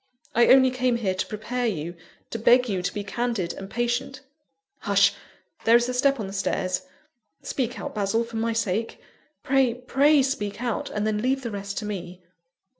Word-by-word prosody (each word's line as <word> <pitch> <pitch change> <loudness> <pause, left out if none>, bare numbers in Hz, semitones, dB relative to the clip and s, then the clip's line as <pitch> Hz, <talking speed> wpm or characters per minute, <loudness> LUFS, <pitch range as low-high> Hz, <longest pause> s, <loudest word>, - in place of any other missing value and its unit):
I 235 +1 +5
only 260 -1 +6
came 255 -1 +1
here 210 -5 0
to 185 - -3
prepare 235 +4 -2
you; 170 -5 -3 0.4
to 230 - -3
beg 245 +2 +5
you 190 -4 -1
to 180 - -2
be 205 - -4
candid 215 -4 -2
and 195 0 -8
patient. 240 +4 -2 0.6
Hush! - - +3 0.5
there 230 - +5
is 240 0 +4
a - - -1
step 275 +1 +2
on 215 - -3
the 195 - -7
stairs. 185 -1 -1 0.6
Speak 245 -2 -2
out, 285 - -5
Basil, 210 +2 0
for 230 -1 -7
my 230 +1 0
sake 225 -1 -1 0.4
pray, 265 -3 +2
pray, 275 +3 +3
speak 220 -7 -2
out, 240 -2 -2
and 210 0 -2
then 215 -1 0
leave 265 +2 0
the 235 - -4
rest 200 -1 -5
to - - -3
me." 180 -3 -6
230 Hz, 190 wpm, -25 LUFS, 200-250 Hz, 0.6 s, only